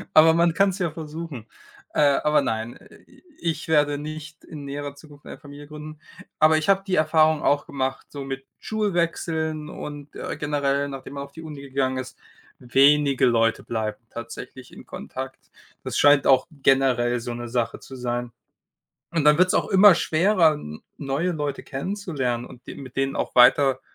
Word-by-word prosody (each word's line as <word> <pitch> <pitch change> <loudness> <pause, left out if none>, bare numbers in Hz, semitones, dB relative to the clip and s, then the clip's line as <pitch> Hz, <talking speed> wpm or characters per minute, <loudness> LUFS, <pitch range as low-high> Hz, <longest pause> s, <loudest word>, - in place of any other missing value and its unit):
Aber 160 +1 +8
man 170 0 +3
kann's 195 -1 +2
ja 175 -3 0
versuchen. 155 -6 -7 0.5
Äh, - - +1 0.2
aber 150 0 +3
nein, 110 +2 -3
Äh, - - -18
i - - -21 0.2
ich 160 -2 -3
werde 145 -2 +2
nicht 155 +1 -8
in 145 -3 -9
näherer 140 0 -5
Zukunft 145 0 -17
eine - - -9
Familie 145 -1 -12
gründen. 150 0 -10 0.4
Aber 155 0 +5
ich 155 - -4
habe 195 0 +4
die 185 -2 0
Erfahrung 155 0 +3
auch 145 0 +1
gemacht, 135 -1 -3
so 140 -1 -7
mit 135 0 -6
Schulwechseln 165 -6 -2
und, 145 -1 -8
äh, - - -5
generell, 140 -1 0
nachdem 135 0 -8
man 140 - -5
auf 140 - -14
die 165 - -10
Uni 150 -3 -8
gegangen 130 -1 -1
ist, 130 - -7 0.4
wenige 140 +2 +4
Leute 115 -2 +2
bleiben 110 -2 -3
tatsächlich 120 +2 -9
in - - -12
Kontakt. 130 0 -7 0.5
Das - - -4
scheint 145 -2 +5
auch 130 -1 +5 0.2
generell 125 -3 +3
so 120 0 -5
'ne 120 0 -6
Sache 115 -1 -2
zu 135 - -11
sein. 120 -1 -3 0.8
Und 165 -3 0
dann 150 +1 +5
wird's 185 0 +4
auch - - +1
immer 195 -1 +7
schwerer, 170 0 +3
n 75 - -9 0.2
neue 145 +5 -1
Leute 145 -3 -3
kennenzulernen 140 - -3
und 125 +1 -14
de - - -7
mit 135 -1 -11
denen 135 0 0
auch - - -3
weiter 130 +1 +5
145 Hz, 175 wpm, -24 LUFS, 130-155 Hz, 0.8 s, Aber